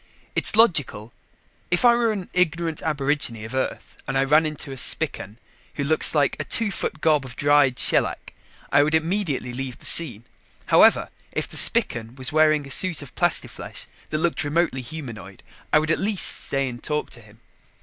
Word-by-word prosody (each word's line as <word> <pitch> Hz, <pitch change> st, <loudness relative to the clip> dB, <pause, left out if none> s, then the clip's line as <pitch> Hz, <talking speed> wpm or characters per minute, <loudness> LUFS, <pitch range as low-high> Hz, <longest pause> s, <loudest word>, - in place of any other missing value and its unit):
It's -, -, +2 dB
logical. 145 Hz, -, +2 dB, 0.6 s
If 175 Hz, +7 st, +1 dB
I 240 Hz, -, +7 dB
were 235 Hz, -1 st, +1 dB
an 195 Hz, -4 st, -5 dB
ignorant 165 Hz, -2 st, -1 dB
aborigine 140 Hz, -7 st, -1 dB
of 110 Hz, -, -9 dB
Earth 130 Hz, 0 st, -4 dB
and 135 Hz, -, -2 dB
I 135 Hz, -, +2 dB
ran 155 Hz, +3 st, +3 dB
into 150 Hz, -2 st, -7 dB
a -, -, -7 dB
Spican, 110 Hz, -3 st, 0 dB, 0.4 s
who 140 Hz, -, -3 dB
looks 155 Hz, +2 st, +3 dB
like 145 Hz, -2 st, +1 dB
a -, -, -2 dB
two 225 Hz, -3 st, 0 dB
foot 155 Hz, -4 st, -5 dB
gob 155 Hz, -3 st, +2 dB
of 130 Hz, -2 st, -10 dB
dried 145 Hz, -3 st, +2 dB
shellac, -, -, 0 dB, 0.4 s
I 145 Hz, -, +5 dB
would 155 Hz, +2 st, +1 dB
immediately 160 Hz, -6 st, -2 dB
leave 130 Hz, -1 st, -6 dB
the -, -, -14 dB
scene. 120 Hz, -10 st, +2 dB, 0.4 s
However, -, -, +4 dB, 0.2 s
if -, -, -2 dB
the -, -, -7 dB
Spican 115 Hz, 0 st, +4 dB
was 130 Hz, 0 st, -2 dB
wearing 155 Hz, -1 st, +2 dB
a 135 Hz, -, -10 dB
suit 175 Hz, +1 st, +2 dB
of 140 Hz, -, -13 dB
plastiflesh -, -, -2 dB, 0.2 s
that 155 Hz, -, -2 dB
looked 165 Hz, +1 st, -1 dB
remotely 145 Hz, -3 st, -1 dB
humanoid, 120 Hz, -9 st, -10 dB, 0.3 s
I -, -, +5 dB
would 155 Hz, +1 st, 0 dB
at -, -, +2 dB
least 200 Hz, -1 st, +1 dB
stay 135 Hz, -1 st, -1 dB
and 120 Hz, -1 st, -9 dB
talk 150 Hz, 0 st, -3 dB
to 120 Hz, -, -11 dB
him. 110 Hz, 0 st, -20 dB
145 Hz, 185 wpm, -22 LUFS, 130-160 Hz, 0.6 s, I